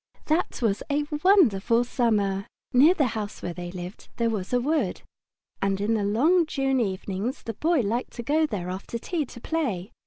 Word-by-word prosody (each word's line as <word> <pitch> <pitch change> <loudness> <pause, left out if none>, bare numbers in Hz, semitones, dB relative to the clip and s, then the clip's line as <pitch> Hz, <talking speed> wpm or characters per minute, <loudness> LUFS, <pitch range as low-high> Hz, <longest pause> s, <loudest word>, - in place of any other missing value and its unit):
That 310 -4 0
was 205 -3 +1
a 290 +1 +1 0.2
wonderful 240 - +4
Summer! 205 -6 0 0.3
Near 295 +8 +6
the 285 -7 +2
house 210 -1 -5
where 175 - -3
they 175 0 -6
lived 180 +1 -8
there 230 -1 +1
was 195 -4 -3
a 250 - +3
wood, 270 - -1 0.6
and 195 0 +1
in 210 +3 +1
the 215 -2 +1
long 305 - +3
June 270 -3 0
evenings 200 +2 -2
the 225 - -4
Boy 315 +6 +2
liked 230 +3 -2
to 235 - -6
go 310 +5 +2
there 180 -8 -4
after 195 +5 -5
tea 310 +6 -2
to 240 - -11
play. 230 - -2
230 Hz, 185 wpm, -26 LUFS, 195-285 Hz, 0.6 s, Near